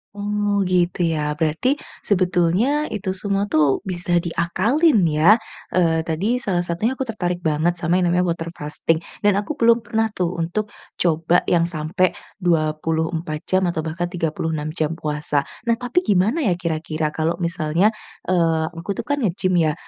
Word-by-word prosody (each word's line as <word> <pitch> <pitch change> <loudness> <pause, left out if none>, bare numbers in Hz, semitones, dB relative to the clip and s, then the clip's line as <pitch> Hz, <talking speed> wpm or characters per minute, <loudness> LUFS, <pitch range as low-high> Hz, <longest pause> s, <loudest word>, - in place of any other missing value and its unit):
Oh, 205 0 0
gitu 180 0 +1
ya 150 -2 -1
berarti, 160 - +1 0.3
sebetulnya 190 - +2
itu 200 -2 -3
semua 200 +1 -1
tuh 150 -5 +2
bisa 175 -2 0
diakalin 210 - +2
ya? 170 +9 +5 0.3
Eee, 165 -3 +2
tadi 190 +10 0
salah 195 -8 -1
satunya 175 +8 -1
aku 265 - -8
tertarik 180 -5 -2
banget 160 +2 +1
sama 170 +2 +2
yang 185 - +2
namanya 180 - +3
water 165 0 -3
fasting, 160 +1 -1 0.2
dan 205 - +5
aku 295 +8 -5
belum 235 -2 +4
pernah 225 0 0
tuh 180 -4 0
untuk, 175 +6 -2 0.3
coba 165 +1 +3
yang 170 -1 +3
sampai 170 +3 0 0.2
24 160 -2 -1
jam 185 0 +3
atau 170 -2 -1
bahkan 160 +2 -3
36 160 -3 -2
jam 155 0 -1
puasa. 150 -2 -1 0.2
Nah 235 - +3
tapi 250 +9 0
gimana 210 - +2
ya 190 - +3
kira-kira 155 -2 -2
kalau 160 +2 -1
misalnya, 170 +2 +1 0.4
eee, 165 -3 +2
aku 170 +3 -5
tuh - - -4
kan 285 - +1
ngegim 185 -6 0
ya, 155 - +1
175 Hz, 155 wpm, -21 LUFS, 160-205 Hz, 0.4 s, ya